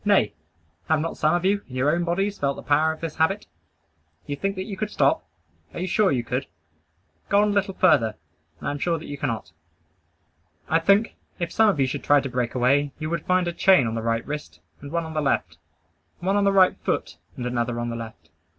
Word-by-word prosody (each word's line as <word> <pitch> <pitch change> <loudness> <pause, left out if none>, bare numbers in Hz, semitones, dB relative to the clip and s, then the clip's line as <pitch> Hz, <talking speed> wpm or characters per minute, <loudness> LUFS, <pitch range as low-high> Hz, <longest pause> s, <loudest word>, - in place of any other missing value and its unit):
Nay, 200 - +3 0.6
have 160 -1 +3
not 165 +2 -3
some 155 +2 +2
of 175 +1 -1
you, 200 +1 +2
in 125 - -9
your 135 +3 +2
own 175 +1 0
bodies, 195 +4 -1
felt 140 -1 0
the - - -9
power 155 +2 +3
of 160 - -8
this 165 -2 -5
habit? 195 +6 +1 0.8
You 145 - -3
think 195 +7 -2
that 185 - -3
you 205 - -5
could 210 +2 -3
stop? - - +2 0.5
Are - - -4
you 180 - -1
sure 190 +1 +2
you 125 -3 0
could? 125 +3 -3 0.8
Go 200 - +4
on 210 - +2
a - - 0
little 200 -1 0
further, 115 - +3 0.4
and - - -6
I - - 0
am 145 - -5
sure 165 +1 0
you 145 -2 -7
cannot. 115 - -3 1.2
I 165 - +3
think, 200 +6 +3 0.2
if 170 -2 -3
some 220 -1 +4
of 190 - 0
you 135 - +4
should 130 - -4
try 145 0 +5
to 135 - -4
break 125 -1 -2
away, 140 +3 +2
you 155 +1 -4
would 170 - -3
find 180 -1 +2
a 170 - -2
chain 185 -6 +5
on 115 - -2
the 115 - -2
right 115 0 -1
wrist, 150 0 -6 0.2
and 140 0 -9
one 170 0 0
on 160 - -7
the 155 - 0
left; 140 - -1 0.6
one 190 +3 0
on 205 0 +3
the 200 - +4
right 190 -2 +5
foot, - - -2 0.2
and 125 - -4
another 120 -1 -1
on 120 0 -2
the - - -4
left. 110 -9 -9
160 Hz, 235 wpm, -24 LUFS, 130-185 Hz, 1.2 s, try